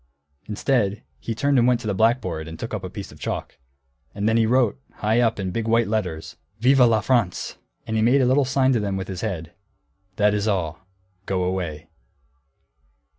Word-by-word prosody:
Instead 105 -1 0 0.2
he 115 - -4
turned 140 +3 +2
and 120 - +4
went 125 -1 +3
to - - -10
the 105 - 0
blackboard 95 -7 +1
and 80 0 -8
took - - -6
up - - -3
a - - -4
piece - - -8
of - - -15
chalk. - - -5 0.6
And 100 +1 -1
then 110 - +3
he 115 -1 +3
wrote, 125 +1 +2
high 110 +3 +1
up, 115 -3 +2
in 95 -2 -2
big 115 +3 -2
white 115 0 +3
letters, 95 -7 -3 0.2
"Vive 135 +4 +4
la 115 -3 +5
France!" 115 -9 0 0.3
And 110 - -3
he 110 - +2
made 125 +5 +4
a - - +3
little 130 +3 +4
sign 130 0 +2
to 120 - +2
them 100 -2 -2
with 95 -1 -4
his 95 -2 -5
head, 85 -7 -4 0.6
"That 105 0 +3
is 105 +1 0
all; 90 -3 -2 0.4
go 95 -2 0
away." 85 -4 -3
110 Hz, 200 wpm, -23 LUFS, 95-120 Hz, 0.6 s, la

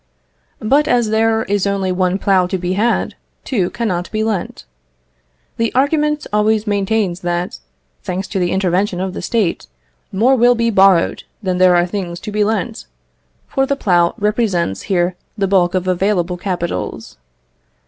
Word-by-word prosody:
But 280 +7 +2
as 240 -3 +2
there 225 0 +2
is 200 0 0
only 195 -2 -1
one 185 0 +1
plough 190 -2 +2
to 190 - -2
be 180 0 -2
had, 225 +5 0 0.3
two 195 -9 -1
cannot 185 -7 -2
be 215 0 -1
lent. 220 -4 -3 0.9
The 230 0 0
argument 300 +2 +1
always 210 0 +2
maintains 200 -3 0
that, 175 0 -3 0.4
thanks 185 +1 -4
to 195 - -2
the 175 -1 +1
intervention 190 0 0
of 190 0 -3
the - - -5
State, 215 -7 -1 0.4
more 235 +7 +3
will 245 0 +4
be 230 0 +1
borrowed 190 -4 +4 0.2
than 185 -2 -1
there 185 -1 +5
are 175 0 +3
things 175 -2 -4
to 210 - -6
be 210 0 +1
lent; 220 +1 -2 0.6
for 270 0 0
the 280 - +1
plough 175 -9 +2
represents 205 - 0
here 175 -1 +1 0.2
the 195 -1 +1
bulk 185 -2 +2
of 185 0 -1
available 185 -1 0
capitals. 180 -1 -4
195 Hz, 160 wpm, -17 LUFS, 180-220 Hz, 0.9 s, there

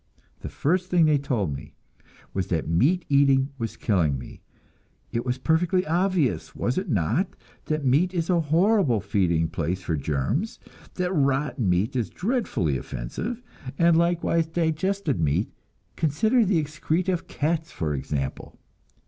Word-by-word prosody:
The - - -6
first 180 +5 0
thing 175 -3 +4
they 150 -2 +3
told 105 - -1
me - - -10 0.6
was 95 -2 -1
that 80 -4 -1
meat 145 - +2
eating 140 -1 +4
was 115 -2 -4
killing 85 - +1
me. 65 - -10 0.7
It 115 - -1
was 125 +1 0
perfectly 175 +5 +1
obvious, 175 -4 0
was 125 +8 0
it 190 -1 -6
not, 115 - +1 0.4
that 155 -2 -2
meat 150 +8 +3
is 170 -3 -1
a 180 -2 +3
horrible 165 - +3
feeding 90 -5 +1
place 85 +3 -3
for 85 - -1
germs, 80 - -1 0.4
that 180 0 -1
rotten 135 - +1
meat 95 +9 +1
is 120 -4 0
dreadfully 185 - -1
offensive, 215 - -5 0.3
and 170 -1 +5
likewise 170 -1 +2
digested 165 - 0
meat 75 -3 +1 0.4
consider 215 - +2
the 190 -2 +2
excreta 160 +4 -1
of 175 - -4
cats, 160 +2 -1
for 75 -3 -2
example! 70 0 -4
145 Hz, 145 wpm, -25 LUFS, -, 0.7 s, and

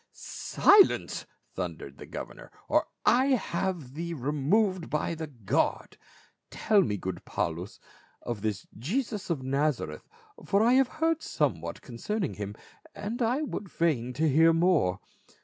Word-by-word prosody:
" - - -51
Silence 405 -2 +3
!" - - -43
thundered - - -5
the - - -9
governor, - - -8
" - - -28
or - - +2 0.2
I 260 +2 +5
have 170 - -3
thee 170 +2 -4
removed 160 - +1
by 150 +2 -1
the 160 -1 -5
guard. 115 -9 -1 0.5
Tell 215 -2 +3
me, 105 - 0
good 95 -2 -5
Paul - - -2
us, - - -10 0.4
of 120 -4 -4
this 105 -2 -2
Jesus 210 - -2
of 150 -6 -1
Nazareth, 135 - -1 0.3
for 200 +2 +2
I 240 +2 +5
have 265 0 +5
heard 320 +2 0
somewhat 85 - -2
con 120 - -9
cerning 210 - -2
him, 100 0 -5 0.4
and 220 +4 -4
I 245 +6 +1
would 210 -9 -5
fain 140 -9 0
hear 160 +1 +4
more." 165 - +2
165 Hz, 150 wpm, -28 LUFS, 125-210 Hz, 0.5 s, I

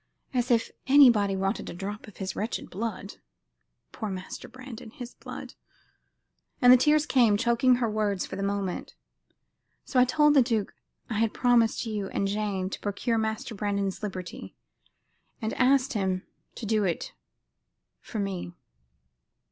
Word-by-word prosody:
As 250 0 0
if 230 -2 +2 0.2
anybody 240 -8 +6
wanted 195 +2 -2
a - - -7
drop 205 +4 -6
of 210 - -14
his 190 -1 -4
wretched 220 +3 -4
blood. 205 0 -5 0.7
Poor 215 - -5
Master 185 -1 -6
Brandon! 255 -3 -10
his 245 +2 -9
blood - - -9 0.5
..." - - -49
and 250 0 +8
the - - +8
tears 300 +4 +3
came, 235 -7 +4
choking 240 +3 +3
her 240 -1 0
words 210 -3 0
for - - -7
the - - -4
moment. 200 -2 -3 0.9
"So 255 - +1
I 250 - +7
told 295 +3 +4
the 280 - +7
duke 230 -4 0 0.3
I 220 -3 -2
had 225 -1 +1
promised 240 -2 +3
you 210 -3 -3
and 195 - -1
Jane 200 -2 -1
to - - -5
procure 225 +3 -1
Master 220 +1 -2
Brandon's 200 -1 -2
liberty, 190 -4 -6 0.8
and 220 -1 -2
asked 270 +2 +3
him 190 -3 -1 0.3
to 230 - -6
do 215 0 +2
it 175 -4 -2 0.9
for - - -8
me. 195 -4 -3
215 Hz, 155 wpm, -27 LUFS, 200-245 Hz, 0.9 s, and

